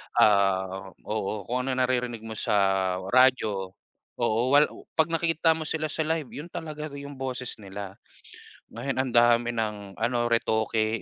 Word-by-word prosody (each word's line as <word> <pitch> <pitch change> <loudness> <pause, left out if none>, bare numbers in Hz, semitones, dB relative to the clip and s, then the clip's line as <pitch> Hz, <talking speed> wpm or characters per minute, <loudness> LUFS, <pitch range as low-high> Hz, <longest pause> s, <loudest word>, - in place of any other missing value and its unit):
ah 95 -2 +3
oo. 105 -1 -3
Kung 125 +4 -2
ano 130 - 0
naririnig 125 -3 -1
mo 110 - -7
sa - - 0 0.6
radyo 110 -7 +3 0.4
oo, 115 +4 +1
wal 145 +2 +6 0.3
pag 160 +1 +2
nakita 165 0 +3
mo 160 - -6
sila 155 0 -2
sa 155 +1 -2
live, 160 -1 0
yun 160 +4 -7
talaga 155 -2 -6
yung 140 -1 -9
boses 130 -1 -3
nila. 100 0 -8 0.7
Ngayon 135 -1 -2
ang 130 - -2
dami 120 0 +4
ng 105 -4 -4
ano 120 +1 0
retoke, 110 -1 +1
120 Hz, 145 wpm, -27 LUFS, 105-140 Hz, 0.7 s, wal